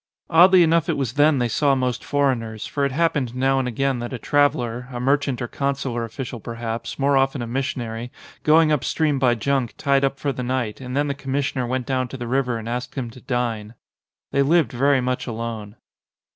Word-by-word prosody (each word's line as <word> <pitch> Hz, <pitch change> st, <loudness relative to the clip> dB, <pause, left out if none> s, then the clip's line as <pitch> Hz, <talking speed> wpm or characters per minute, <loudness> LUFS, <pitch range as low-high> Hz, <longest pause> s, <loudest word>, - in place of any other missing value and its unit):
Oddly 180 Hz, +2 st, +7 dB
enough 165 Hz, -1 st, +2 dB
it -, -, +1 dB
was 130 Hz, -5 st, -2 dB
then 145 Hz, +1 st, +4 dB
they 120 Hz, -1 st, +1 dB
saw 140 Hz, +4 st, +2 dB
most 125 Hz, -3 st, -1 dB
foreigners, 120 Hz, -6 st, -1 dB
for 140 Hz, -, -2 dB
it 140 Hz, -, -1 dB
happened 140 Hz, -5 st, 0 dB
now 135 Hz, +1 st, +2 dB
and 130 Hz, -, -1 dB
again 135 Hz, +1 st, 0 dB
that 120 Hz, 0 st, -5 dB
a -, -, -3 dB
124 145 Hz, +4 st, +3 dB
THE -, -, -7 dB
MANNINGS 120 Hz, +2 st, -6 dB
traveller, 125 Hz, -, -6 dB
a -, -, -3 dB
merchant 135 Hz, 0 st, +1 dB
or -, -, -3 dB
consular 135 Hz, -3 st, -2 dB
official 115 Hz, +1 st, -6 dB
perhaps, 115 Hz, +1 st, -5 dB
more 140 Hz, 0 st, +2 dB
often 135 Hz, -1 st, +1 dB
a -, -, -3 dB
missionary, 120 Hz, -2 st, -3 dB, 0.3 s
going 155 Hz, 0 st, +5 dB
up 150 Hz, -4 st, +1 dB
stream 150 Hz, -4 st, 0 dB
by 125 Hz, -2 st, +3 dB
junk, 130 Hz, +1 st, -1 dB
tied 140 Hz, -1 st, +2 dB
up 135 Hz, 0 st, +1 dB
for 140 Hz, -, -1 dB
the 130 Hz, -, -5 dB
night, 125 Hz, -2 st, -2 dB
and 125 Hz, +1 st, -4 dB
then 145 Hz, +1 st, +1 dB
the 140 Hz, -, -1 dB
commissioner 135 Hz, -2 st, -2 dB
went 130 Hz, 0 st, -2 dB
down 130 Hz, -2 st, -1 dB
to 135 Hz, -, -8 dB
the 120 Hz, -, -5 dB
river 125 Hz, -1 st, 0 dB
and 115 Hz, 0 st, -7 dB
asked 125 Hz, +1 st, -4 dB
him 125 Hz, -4 st, -4 dB
to 125 Hz, -, -14 dB
dine. 120 Hz, -3 st, -2 dB, 0.6 s
They 140 Hz, -, +2 dB
lived 155 Hz, -2 st, +3 dB
very 135 Hz, +2 st, +2 dB
much 125 Hz, +1 st, -2 dB
alone. 115 Hz, -3 st, -5 dB
130 Hz, 220 wpm, -22 LUFS, 120-140 Hz, 0.6 s, Oddly